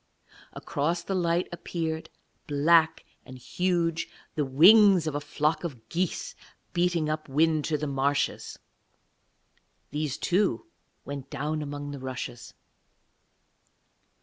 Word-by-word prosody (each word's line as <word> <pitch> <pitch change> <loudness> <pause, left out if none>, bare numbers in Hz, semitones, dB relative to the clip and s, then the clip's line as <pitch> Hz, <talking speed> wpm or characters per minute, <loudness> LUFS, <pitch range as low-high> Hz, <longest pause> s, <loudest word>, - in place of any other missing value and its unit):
Across 165 +5 -2
the 195 - -3
light 175 -1 +1
appeared, 160 -2 -4 0.4
black 160 +3 +3 0.2
and 130 - -11
huge, 170 +3 -1 0.2
the 150 - 0
wings 180 +6 +6
of 155 - -2
a 145 - -2
flock 150 +3 -1
of 125 -10 -7
geese 175 +1 -2 0.4
beating 175 -2 +1
up 155 -1 -3
wind 155 +2 +2
to 155 -2 0
the 150 - -3
marshes. 140 0 -1 1.3
These, 150 -1 -2
too, 195 - +1 0.4
went 140 -1 -6
down 150 +2 -3
among 145 0 -5
the 140 - -7
rushes. 130 -2 -7
155 Hz, 115 wpm, -27 LUFS, 145-170 Hz, 1.3 s, wings